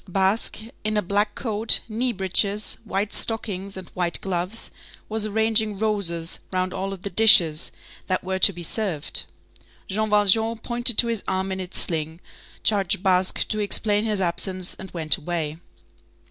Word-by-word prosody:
Basque, 195 +4 0 0.3
in 215 0 -1
a 210 - 0
black 205 +3 -1
coat, 220 -2 +4
knee 235 +3 -1
breeches, 200 +1 0
white 200 0 -3
stockings 200 -4 -3
and 185 -2 -9
white 175 -2 0
gloves, 185 +3 -3 0.4
was 215 0 -1
arranging 220 -1 +1
roses 190 -6 -1
round 185 0 -2
all 195 +1 -4
of 190 -2 -9
the 200 - -4
dishes 175 -6 +5 0.4
that 185 - -1
were 190 0 -3
to 200 - +8
be 175 -2 -9
served. 170 -5 -2 0.6
Jean 215 +2 -2
Valjean 210 +2 +3
pointed 240 0 +3
to - - +6
his 230 -3 -3
arm 190 +1 -2
in 190 - -4
its 185 0 -3
sling, 160 0 -2 0.4
charged 200 -2 +1
Basque 185 -1 +3
to 215 - -3
explain 210 0 0
his 215 -3 0
absence, 185 +1 -1
and 190 - -8
went 160 0 +1
away. 160 -2 -4
195 Hz, 160 wpm, -23 LUFS, 180-215 Hz, 0.6 s, to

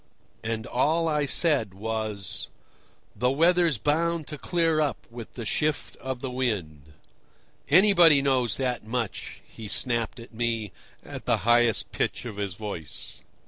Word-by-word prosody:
And 110 0 -3
all 155 +7 +1
I 150 -2 0
said 135 - +3
was: 110 -2 -3 0.7
"The 125 - +1
weather's 165 +1 +3
bound 165 +5 0
to 150 - -6
clear 165 -2 +1
up 145 -7 -2
with 115 -1 -9
the 120 - -6
shift 150 +6 -1
of 130 -1 -5
wind." 100 - -3 0.8
"Anybody 175 -3 +7
knows 130 -4 +1
that 125 -3 -1
much!" 115 -1 -4
he 110 - -10
snapped 120 +2 +1
at 115 0 -12
me, 115 -3 -2 0.3
at - - -8
the - - +2
highest 120 -2 +3
pitch - - -2
of 110 -4 -7
his 100 -3 -3
voice. 95 - -7
125 Hz, 140 wpm, -26 LUFS, 110-150 Hz, 0.8 s, Anybody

